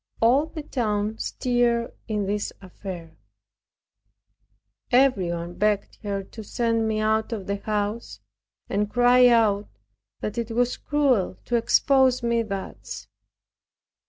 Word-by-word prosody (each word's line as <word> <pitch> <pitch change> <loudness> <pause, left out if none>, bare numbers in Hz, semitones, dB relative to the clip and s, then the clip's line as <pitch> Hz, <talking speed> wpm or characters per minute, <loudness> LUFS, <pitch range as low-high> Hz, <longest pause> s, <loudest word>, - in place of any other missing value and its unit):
All 260 +7 +4
the 315 -1 -7
town 215 -5 -1
stirred 240 -1 0
in 210 -3 -1
this 205 +1 -2
affair. 180 -3 -9 1.8
Everyone 180 -10 +2
begged 205 +2 0
her 200 -2 -3
to 220 +3 -10
send 230 +1 0
me 215 -1 0
out 220 +1 +1
of 210 -5 -4
the 200 0 -2
house, 205 - -3 0.5
and 205 +1 -1
cried 245 +2 +5
out 215 -4 +3 0.5
that 210 +3 -3
it 230 -1 -3
was 245 +2 +1
cruel 265 -11 +1
to 240 - -1
expose 260 +2 +3
me 235 0 +2
thus. 200 -4 -6
220 Hz, 120 wpm, -25 LUFS, 205-245 Hz, 1.8 s, cried